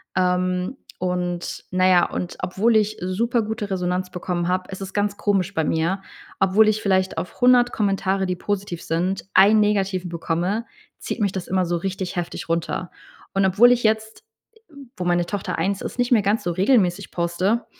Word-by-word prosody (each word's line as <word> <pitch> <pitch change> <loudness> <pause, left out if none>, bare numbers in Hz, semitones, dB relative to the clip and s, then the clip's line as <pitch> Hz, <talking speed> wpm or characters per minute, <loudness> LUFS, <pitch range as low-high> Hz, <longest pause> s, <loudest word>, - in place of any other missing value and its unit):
Ähm, 180 +4 0 0.2
und 180 -1 -3
na 185 0 +3
ja 180 -2 +5
und 175 - -4
obwohl 200 +6 +1
ich 215 0 +2
supergute 220 +2 -1
Resonanz 180 0 -1
bekommen 175 -1 -3
habe, 185 0 0
es 190 0 -8
ist 190 0 -6
ganz 205 0 0
komisch 195 -2 0
bei 160 - +1
mir. 165 +5 0 0.4
Obwohl 195 +3 +4
ich 215 0 +2
vielleicht 190 -1 +1
auf 180 - -6
100 245 0 +5
Kommentare, 195 -2 0
die 180 - -1
positiv 190 -2 -4
sind, 180 +4 -1
1 205 +3 +6
Negativen 195 -3 0
bekomme, 175 +6 -2 0.3
zieht - - -5
mich 200 -3 +1
das 190 -2 -5
immer 185 0 +1
so 175 0 -1
richtig 190 +1 -4
heftig 170 -1 -4
runter. 170 +1 -2 0.4
Und 195 0 +2
obwohl 215 +6 +6
ich 245 -1 +3
jetzt, 220 0 0 0.6
äh, - - -12 0.2
wo 180 - -3
meine 175 0 +2
Tochter 200 +2 -4
1 195 0 -1
ist, - - -6
nicht 245 0 0
mehr 230 -4 +5
ganz 205 +3 0
so 175 - -1
regelmäßig 190 0 +2
poste, 180 +7 0
190 Hz, 180 wpm, -22 LUFS, 180-210 Hz, 0.6 s, 1